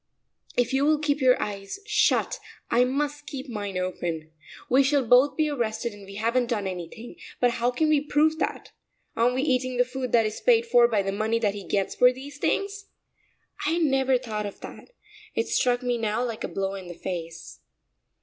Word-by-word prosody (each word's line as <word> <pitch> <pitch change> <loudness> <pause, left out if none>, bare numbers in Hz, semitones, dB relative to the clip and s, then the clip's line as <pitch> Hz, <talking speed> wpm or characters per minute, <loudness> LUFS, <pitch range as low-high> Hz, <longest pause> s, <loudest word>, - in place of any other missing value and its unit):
"If 245 +1 +1
you 270 +1 +2
will 305 +1 +4
keep 295 -1 -1
your 255 -1 +5
eyes 200 - -5
shut 425 - +2 0.3
I 245 +1 +4
must 290 +3 -2
keep 275 0 -6
mine 205 -5 -4
open. 170 -3 -3 0.4
We 260 +2 +5
shall 275 -1 +2
both 250 +5 +5
be 310 -1 +2
arrested 235 -5 -2
and 200 -1 -13
we 195 - -10
haven't 235 +4 +1
done 220 -5 -1
anything, 190 - -7 0.2
but 245 -1 +3
how 240 +1 0
can 280 +6 0
we 305 -2 +3
prove 305 +2 +2
that? - - -3 0.4
Aren't 240 +2 +2
we 260 - 0
eating 255 -3 0
the 250 - +4
food 255 0 -5
that 230 -2 +5
is 215 0 -4
paid 470 -2 +4
for 240 - +5
by 215 -4 +1
the 195 - -1
money 215 +3 0
that 210 -3 0
he 205 -1 -7
gets 195 -1 0
for 250 0 +5
these 275 +3 -10
things?" 405 +4 -1 0.8
I 310 - +2
had 340 0 +1
never 270 -3 +3
thought 215 -4 -4
of 200 - -10
that; - - -10 0.5
it 225 - 0
struck 245 0 +1
me 245 -1 0
now 220 +2 0
like 230 -2 -5
a - - -1
blow 195 0 -3
in 190 -2 -7
the 175 - -8
face. 170 -2 -6
245 Hz, 205 wpm, -26 LUFS, 205-275 Hz, 0.8 s, your